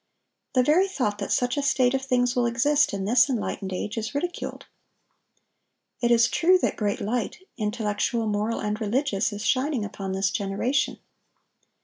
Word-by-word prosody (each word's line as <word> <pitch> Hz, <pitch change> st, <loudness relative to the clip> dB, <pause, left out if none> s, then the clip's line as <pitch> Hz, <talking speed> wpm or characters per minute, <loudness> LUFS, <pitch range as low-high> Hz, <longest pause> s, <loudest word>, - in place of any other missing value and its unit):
The 255 Hz, -, +5 dB
very 330 Hz, +8 st, +4 dB
thought 210 Hz, -, -2 dB
that 200 Hz, -, -4 dB
such 245 Hz, +2 st, +1 dB
a -, -, +1 dB
state 260 Hz, -2 st, +2 dB
of 265 Hz, -, 0 dB
things 250 Hz, -2 st, +1 dB
will 245 Hz, -1 st, +2 dB
exist 280 Hz, +5 st, +2 dB
in 195 Hz, -1 st, -3 dB
this 240 Hz, +5 st, +4 dB
enlightened 210 Hz, -5 st, -3 dB
age 205 Hz, +5 st, -3 dB
is 220 Hz, +4 st, -5 dB
ridiculed. 355 Hz, +5 st, -4 dB, 1.4 s
It 240 Hz, -, +2 dB
is 230 Hz, -1 st, +5 dB
true 365 Hz, +2 st, +4 dB
that -, -, -1 dB
great 205 Hz, -2 st, -1 dB
light, 230 Hz, +2 st, -2 dB, 0.2 s
intellectual, 220 Hz, 0 st, -1 dB
moral, 210 Hz, +2 st, -1 dB
and 210 Hz, +1 st, -3 dB
religious, 220 Hz, -1 st, 0 dB
is 205 Hz, +1 st, -5 dB
shining 260 Hz, -4 st, +1 dB
upon 195 Hz, -2 st, -5 dB
this 195 Hz, 0 st, 0 dB
generation. 205 Hz, +8 st, -1 dB
235 Hz, 160 wpm, -25 LUFS, 205-265 Hz, 1.4 s, The